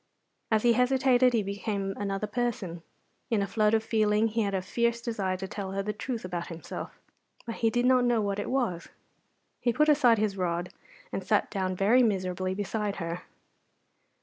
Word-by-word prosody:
As 220 Hz, -1 st, +2 dB
he 240 Hz, -1 st, +5 dB
hesitated 250 Hz, 0 st, +3 dB
he 225 Hz, -3 st, +2 dB
became 200 Hz, 0 st, -3 dB
another 200 Hz, 0 st, -2 dB
person. 210 Hz, -7 st, -3 dB, 0.5 s
In 220 Hz, -4 st, +2 dB
a -, -, 0 dB
flood 215 Hz, +1 st, +2 dB
of 220 Hz, -, +1 dB
feeling 215 Hz, 0 st, +2 dB
he 225 Hz, +1 st, 0 dB
had 200 Hz, -2 st, 0 dB
a 190 Hz, -, 0 dB
fierce 235 Hz, +4 st, 0 dB
desire 205 Hz, -6 st, -2 dB
to 190 Hz, +1 st, -5 dB
tell 195 Hz, -1 st, -5 dB
her 195 Hz, 0 st, -1 dB
the 210 Hz, +1 st, -2 dB
truth 225 Hz, +1 st, -4 dB
about 175 Hz, -2 st, -4 dB
himself. 165 Hz, -1 st, -7 dB, 0.5 s
But 230 Hz, -1 st, -5 dB
he 225 Hz, -, +2 dB
did 245 Hz, +2 st, +1 dB
not 255 Hz, -1 st, +4 dB
know 240 Hz, -2 st, +3 dB
what 200 Hz, -1 st, -1 dB
it 205 Hz, -, -3 dB
was. 240 Hz, -10 st, -1 dB, 0.7 s
He 240 Hz, -, +1 dB
put 300 Hz, +6 st, +3 dB
aside 260 Hz, -6 st, +5 dB
his 210 Hz, -2 st, 0 dB
rod, 175 Hz, -1 st, -2 dB, 0.4 s
and -, -, -3 dB
sat -, -, +1 dB
down 185 Hz, -2 st, -1 dB
very 210 Hz, +7 st, +4 dB
miserably 185 Hz, -4 st, 0 dB
beside 205 Hz, 0 st, -2 dB
her. 170 Hz, 0 st, -4 dB
210 Hz, 185 wpm, -28 LUFS, 195-235 Hz, 0.7 s, he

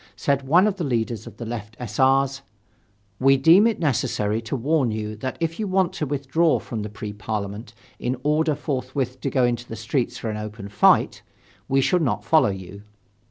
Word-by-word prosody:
Said 140 Hz, -1 st, -1 dB
one 175 Hz, +7 st, +5 dB
of 210 Hz, -2 st, 0 dB
the 175 Hz, -, -2 dB
leaders 115 Hz, -5 st, -2 dB
of -, -, -11 dB
the 120 Hz, -, -6 dB
left 115 Hz, -1 st, -6 dB
S. 110 Hz, -4 st, -6 dB
R.'s: 135 Hz, +1 st, +3 dB, 0.8 s
"We 135 Hz, +1 st, +5 dB
deem 170 Hz, +10 st, +6 dB
it 230 Hz, -, 0 dB
necessary 110 Hz, -7 st, 0 dB
to 115 Hz, +4 st, -4 dB
warn 135 Hz, +1 st, +1 dB
you 110 Hz, 0 st, -4 dB
that 130 Hz, +4 st, -4 dB
if 165 Hz, +1 st, -2 dB
you 215 Hz, -, -1 dB
want 185 Hz, -2 st, +1 dB
to 150 Hz, -, -3 dB
withdraw 145 Hz, +4 st, +1 dB
from 115 Hz, -4 st, -5 dB
the 105 Hz, -, -5 dB
Pre 105 Hz, 0 st, -7 dB
Parliament 105 Hz, +2 st, -5 dB, 0.2 s
in 125 Hz, +1 st, -2 dB
order 155 Hz, +1 st, +2 dB
forthwith 130 Hz, -2 st, -3 dB
to 135 Hz, -, -1 dB
go 130 Hz, -1 st, +1 dB
into 120 Hz, 0 st, 0 dB
the 115 Hz, -, -6 dB
streets 120 Hz, +3 st, -2 dB
for 110 Hz, -, -4 dB
an 105 Hz, -, -4 dB
open 105 Hz, -1 st, -7 dB
fight, 100 Hz, -, +3 dB, 0.5 s
we 135 Hz, 0 st, +2 dB
shall 180 Hz, +6 st, +2 dB
not 110 Hz, -9 st, -1 dB
follow 155 Hz, -4 st, +4 dB
you." 95 Hz, 0 st, -7 dB
130 Hz, 200 wpm, -23 LUFS, 110-145 Hz, 0.8 s, deem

